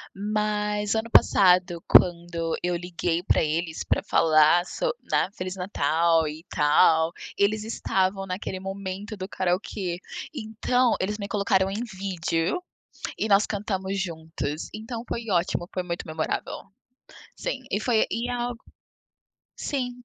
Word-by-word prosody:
Mas 210 0 -1
ano 220 +1 -1
passado 180 -4 +5
quando 170 -2 +4
eu 175 0 +1
liguei 175 -1 -2
pra - - +3
eles 160 +1 -2
pra - - +1
falar 155 +2 +4
so - - -1 0.2
né, - - +2
"feliz 185 0 -4
natal 165 -3 +2
e 155 +2 -7
tal", 160 +2 +4 0.3
eles 210 +1 +2
estavam 195 -3 0
naquele 185 0 -4
momento 195 +2 -5
do 190 0 -6
karaokê. 180 0 -2 0.3
Então 245 0 +1
eles 210 +3 -1
me 200 - -4
colocaram 195 -2 +2
em 205 +4 -3
vídeo 190 - -2 0.5
e - - 0
nós 205 0 +5
cantamos 195 -2 -2
juntos, 160 -3 -4
então 225 +2 -6
foi 235 - -4
ótimo, 175 0 0
foi 185 - -1
muito 175 -1 -4
memorável. 155 0 -3 0.7
Sim, - - -3
e - - +1
foi 235 -4 +3
e 235 +2 -2
a 245 0 -1 1.1
sim, 255 -4 -1
190 Hz, 130 wpm, -26 LUFS, 170-210 Hz, 1.1 s, passado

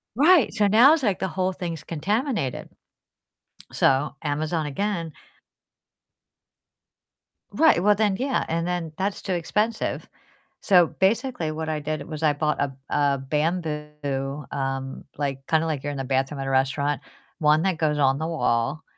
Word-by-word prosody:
Right. 305 - +5
So 210 -2 +2
now 240 +9 +7
it's 310 -5 0
like 200 -4 +1
the 190 - -1
whole 185 +1 -1
thing's 170 -4 -5
contaminated. 205 - -2 1.0
So, 135 +1 +2
Amazon 155 +1 -1
again. 170 +1 -2 2.4
Right. 315 - +4
Well, 210 0 +5
then 205 -2 +1
yeah, 265 +1 0
and 165 +1 -1
then 175 -3 -2
that's 195 +1 -2
too 190 - -2
expensive. 210 +6 -1 0.5
So 180 -5 +5
basically 210 - 0
what 160 0 -4
I 155 -1 -1
did 155 +1 -4
was 155 -1 -6
I 150 -2 +3
bought 150 +1 -1
a 140 - 0 0.2
a 140 -1 +2
bamboo, 150 -2 -3
um, 135 -1 -4
like, 135 -2 -3
kinda 160 0 +2
like 150 -4 -2
you're 145 - -2
in 140 - -6
the 135 - -3
bathroom 135 +2 -1
at 135 - -4
a - - -1
restaurant, 135 +1 +1 0.4
one 150 +1 +3
that 190 -4 0
goes 150 -2 +1
on 135 0 +2
the 160 - -2
wall, 140 -2 0
155 Hz, 155 wpm, -24 LUFS, 145-190 Hz, 2.4 s, now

